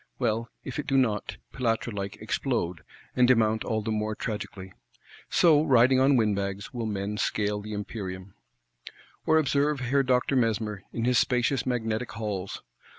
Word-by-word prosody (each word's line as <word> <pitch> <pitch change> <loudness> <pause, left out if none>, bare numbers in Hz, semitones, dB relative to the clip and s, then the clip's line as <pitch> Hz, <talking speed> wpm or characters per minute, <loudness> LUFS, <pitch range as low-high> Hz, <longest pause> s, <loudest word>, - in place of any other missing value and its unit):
Well 115 -1 -1
if 130 +2 -5
it 150 - -4
do 135 -2 +2
not, 110 -6 0 0.2
Pilatre 115 -1 -1
like, 100 -1 -4
explode; 85 -2 -2 0.3
and 125 -1 +5
demount 110 -3 +3
all 110 -1 -1
the 110 - -2
more 110 0 -1
tragically!—So, 105 - -1
riding 130 -2 +5
on 135 +1 +5
windbags, 100 -2 -1
will 115 -3 -3
men 105 0 -3
scale 105 0 0
the 105 0 -6
Empyrean. 95 -2 -6 0.9
Or 160 - +5
observe 145 -1 +2
Herr 135 +2 +2
Doctor 130 +1 +1
Mesmer, 110 -4 0
in 115 - -2
his 125 0 +4
spacious 125 +1 +1
Magnetic 115 -1 -2
Halls. 100 -4 -4
115 Hz, 150 wpm, -27 LUFS, 105-130 Hz, 0.9 s, and